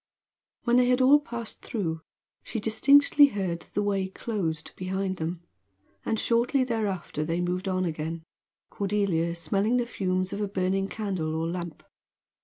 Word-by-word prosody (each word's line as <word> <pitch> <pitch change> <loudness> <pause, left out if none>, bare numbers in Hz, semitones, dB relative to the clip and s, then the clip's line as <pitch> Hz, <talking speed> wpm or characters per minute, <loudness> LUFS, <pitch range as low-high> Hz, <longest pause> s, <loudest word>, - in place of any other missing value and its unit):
When 240 0 +3
they 250 0 +5
had 250 +1 +3
all 270 +3 +7
passed 235 -5 -6
through 165 -9 -3 0.4
she 225 - -4
distinctly 280 +7 +6
heard 185 -8 -3
the 205 - +1
way 195 -2 0
closed 185 -6 -3
behind 190 +1 -2
them; 165 +1 -4 0.6
and 220 - 0
shortly 245 +3 +2
thereafter 210 -10 -2
they 165 +2 -1
moved 180 +2 -1
on 185 -1 0
again, 160 0 -4 0.5
Cordelia 195 -5 0
smelling 200 +7 +1
the 245 - +1
fumes 185 -3 -1
of 200 - -3
a 205 - 0
burning 195 0 0
candle 185 -8 -3
or 160 +1 -1
lamp. 170 -1 -5
195 Hz, 150 wpm, -27 LUFS, 175-225 Hz, 0.6 s, all